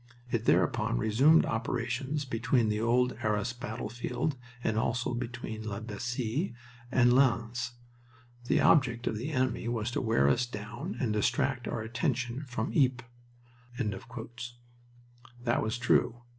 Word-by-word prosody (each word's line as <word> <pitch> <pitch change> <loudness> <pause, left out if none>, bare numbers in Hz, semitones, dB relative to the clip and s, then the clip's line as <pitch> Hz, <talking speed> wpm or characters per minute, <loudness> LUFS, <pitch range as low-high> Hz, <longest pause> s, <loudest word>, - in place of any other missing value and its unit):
It 115 -1 0
thereupon - - +2
resumed 130 - +5
operations 125 +5 -2
between 120 -1 +1
the 105 0 0
old 125 +2 +3
Arras 105 +2 0
battlefield 120 +5 -3 0.3
and 110 - +1
also 120 +2 0
between 120 -2 -5
La 100 -1 -3
Bassee 120 - -3 0.4
and 120 -2 +5
Lens. 120 -2 +2 0.7
The - - +3
object 125 -6 +4
of - - 0
the 125 +7 -3
enemy 130 -4 0
was 120 -1 -1
to - - -1
wear 110 - +3
us 120 - +2
down 115 - -6
and 115 -5 0
distract 120 +4 +1
our - - -2
attention 125 +2 -2
from 120 -3 -3
Ypres." 120 -1 -4 0.9
That 120 -1 +2
was 110 +2 -1
true. 120 -1 +2
120 Hz, 130 wpm, -30 LUFS, 115-125 Hz, 0.9 s, resumed